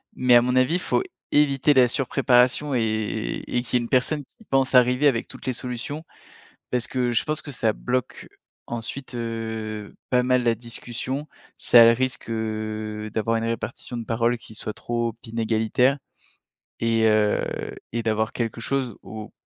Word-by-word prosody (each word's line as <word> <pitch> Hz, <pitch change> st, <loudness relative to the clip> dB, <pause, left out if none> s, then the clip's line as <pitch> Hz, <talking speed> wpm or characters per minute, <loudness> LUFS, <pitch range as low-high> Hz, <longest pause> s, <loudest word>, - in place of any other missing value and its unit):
mais, 125 Hz, -1 st, +4 dB
à 120 Hz, -, +8 dB
mon 125 Hz, +1 st, 0 dB
avis, 130 Hz, +7 st, +3 dB
faut -, -, +1 dB, 0.3 s
éviter 145 Hz, -1 st, +4 dB
la 130 Hz, -2 st, +6 dB
surpréparation 130 Hz, +2 st, +2 dB
et 110 Hz, -, -1 dB
et 120 Hz, -, -1 dB
qu'il 125 Hz, -, -9 dB
y -, -, -2 dB
ait -, -, -3 dB
une 115 Hz, -, -6 dB
personne 145 Hz, +4 st, +1 dB
qui -, -, -18 dB
pense 135 Hz, -4 st, +1 dB
arriver 125 Hz, +3 st, +5 dB
avec 120 Hz, -5 st, +1 dB
toutes -, -, -11 dB
les 130 Hz, -, +1 dB
solutions, 125 Hz, +5 st, -5 dB, 0.7 s
parce 125 Hz, -2 st, 0 dB
que 125 Hz, -2 st, 0 dB
je 120 Hz, -, +2 dB
pense 155 Hz, 0 st, -1 dB
que 145 Hz, -, -8 dB
ça 115 Hz, -4 st, +1 dB
bloque 125 Hz, +2 st, -3 dB, 0.4 s
ensuite, 120 Hz, +3 st, -5 dB
heu, 110 Hz, -2 st, -4 dB
pas 125 Hz, -1 st, +3 dB
mal 125 Hz, 0 st, +2 dB
la 115 Hz, -1 st, +2 dB
discussion, 120 Hz, +4 st, -5 dB, 0.3 s
ça 120 Hz, -, +7 dB
a -, -, +10 dB
le 115 Hz, -, +8 dB
risque, 130 Hz, 0 st, -2 dB
heu, 110 Hz, -1 st, -3 dB
d'avoir 115 Hz, +1 st, 0 dB
une 115 Hz, -, -2 dB
répartition 115 Hz, +1 st, -4 dB
de 115 Hz, -, -5 dB
parole 115 Hz, +1 st, +1 dB
qui 110 Hz, -1 st, -10 dB
soit 110 Hz, -, -4 dB
trop 120 Hz, +1 st, -2 dB
inégalitaire 115 Hz, +3 st, +1 dB, 0.8 s
et 115 Hz, -1 st, +2 dB
heu 105 Hz, -1 st, +1 dB, 0.2 s
et 115 Hz, 0 st, -2 dB
d'avoir 110 Hz, -1 st, 0 dB
quelque 115 Hz, -1 st, -3 dB
chose, 130 Hz, -2 st, -1 dB
au 110 Hz, +2 st, -8 dB
120 Hz, 175 wpm, -24 LUFS, 110-130 Hz, 0.8 s, a